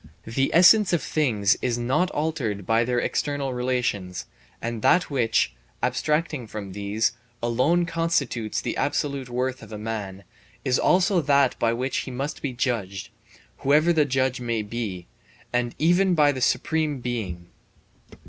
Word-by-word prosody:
The 135 +4 0
essence 185 +3 +6
of 170 - +1
things 110 -9 +2
is 120 -2 0
not 135 +9 +1
altered 135 - -2
by 115 +3 +3
their 125 +1 -1
external 140 +1 -1
relations, 125 -8 -2 0.3
and 115 -1 -4
that 180 +4 +3
which, 115 - +1 0.3
abstracting 150 -5 0
from 105 -2 -7
these, 100 +3 0 0.3
alone 130 +10 +2
constitutes 165 -10 -1
the - - -3
absolute 140 -3 -1
worth 125 +1 -2
of 110 -1 -8
man, 105 -3 -5 0.4
is 130 - +2
also 185 0 +3
that 140 -2 +3
by 115 - +2
which 130 +3 -2
he - - -3
must 135 +4 -4
be 140 - -2
judged, 110 -7 -2 0.5
whoever 155 +5 +4
the 155 -2 +3
judge 130 -1 0
may 115 -3 -1
be, 105 -5 -5 0.5
and 120 -1 0
even 175 +3 +3
by 150 -2 +5
the 130 -2 -5
Supreme 155 +1 +1
Being. 95 -9 -4
125 Hz, 145 wpm, -25 LUFS, 115-150 Hz, 0.5 s, essence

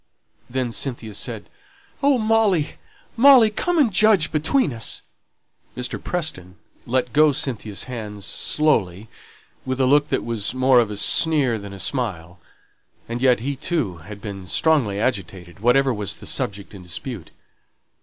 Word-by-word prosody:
Then 125 -1 -2
Cynthia 115 -3 -4
said, - - -5 0.5
"Oh, 280 -1 +4
Molly, 215 -8 +1 0.4
Molly, 245 -3 +7
come 350 +10 -1
and 255 -10 +3
judge 205 -5 +4
between 155 - +1
us!" 115 0 -5 0.7
Mr. 125 0 -4
Preston 95 - -3 0.3
let 125 -1 -1
go 155 +1 +5
Cynthia's 110 -7 -3
hands 105 -5 -7
slowly, 110 - 0 0.5
with 130 0 -3
a 130 - +3
look 145 +3 +3
that - - -1
was 115 -1 -1
more 130 -1 +4
of 115 -3 +1
a 105 - -5
sneer 140 -2 +2
than 100 -1 -9
a 100 - -9
smile; 95 -8 -3 0.7
and 120 +1 -4
yet 125 -3 +3
he, 140 +3 -2
too, 130 - -2
had 100 +6 -11
been 100 -3 -7
strongly 125 - +1
agitated, 95 -5 -3
whatever 130 +4 +3
was 105 -4 -3
the - - -12
subject 100 0 -3
in 100 - -10
dispute. 90 - -7
125 Hz, 145 wpm, -22 LUFS, 100-155 Hz, 0.7 s, Molly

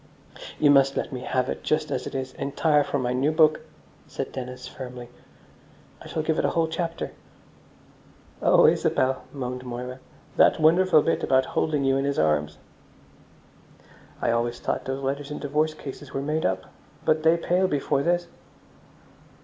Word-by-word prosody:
"You 145 -2 +5
must 135 -1 +4
let - - -3
me 130 - -4
have 130 0 -1
it - - -4
just 155 0 -1
as 125 - -2
it - - -7
is, 130 -1 -4
entire, 145 +2 +1
for 140 - -2
my 125 -2 -1
new 135 +4 +1
book," 155 -1 +4 0.5
said - - -5
Dennis 125 -1 -7
firmly. 125 -2 -8 0.9
"I - - -10
shall 155 - -3
give 155 0 0
it - - +1
a - - +3
whole 165 -1 +1
chapter." 165 +1 -3 1.3
"Oh, - - +5
Isabel," 130 0 +2
moaned 125 -2 -5
Moira, 125 +1 -6 0.4
"that - - +5
wonderful 160 0 +5
bit - - 0
about 130 0 +3
holding 150 -3 0
you 135 0 +2
in 135 - 0
his 140 0 -1
arms!" 75 -1 +1 1.6
"I - - +1
always 120 +1 -1
thought - - -2
those 135 +1 -4
letters 140 +2 -3
in 150 - -5
divorce 155 +2 0
cases 140 -1 -9
were 135 - -1
made 155 +2 0
up. 95 0 -2 0.4
But 155 0 +3
they 160 +2 +4
pale 180 +2 +1
before 140 -3 0
this." 175 +3 +1
140 Hz, 165 wpm, -25 LUFS, 125-155 Hz, 1.6 s, You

